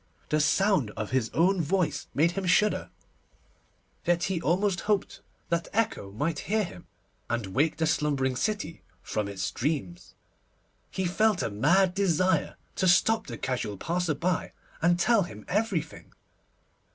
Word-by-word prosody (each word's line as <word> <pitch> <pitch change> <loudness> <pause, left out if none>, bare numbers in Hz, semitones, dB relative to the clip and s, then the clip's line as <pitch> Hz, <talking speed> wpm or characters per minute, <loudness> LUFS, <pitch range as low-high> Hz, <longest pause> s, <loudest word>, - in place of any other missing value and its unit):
The 155 - +2
sound 165 - +2
of 110 -1 -4
his 130 -4 +1
own 180 +2 +3
voice 155 -3 0
made 165 +4 +3
him 190 +1 -3
shudder, 210 +4 +2 1.1
yet 175 0 +1
he 190 -4 -1
almost 185 +3 +1
hoped 205 -3 0 0.3
that 170 0 0
Echo 215 - -1
might 150 +9 -2
hear 215 +1 +2
him, 175 -2 -9 0.4
and 120 -2 -1
wake 135 +12 0
the 160 - +1
slumbering 145 -4 +1
city 170 - -2 0.2
from 105 -2 -2
its 100 -2 -3
dreams. 125 - -3 0.7
He 190 - -2
felt 205 +2 +2
a - - -2
mad 175 - +3
desire 185 -3 +1 0.2
to 190 - +2
stop 220 +5 +3
the - - -6
casual 120 -6 -3
passer 170 - -1
by, 180 +4 -1 0.3
and 175 +2 +4
tell 230 +2 +4
him 110 - -7
everything. 190 -7 -2
170 Hz, 145 wpm, -28 LUFS, 145-190 Hz, 1.1 s, and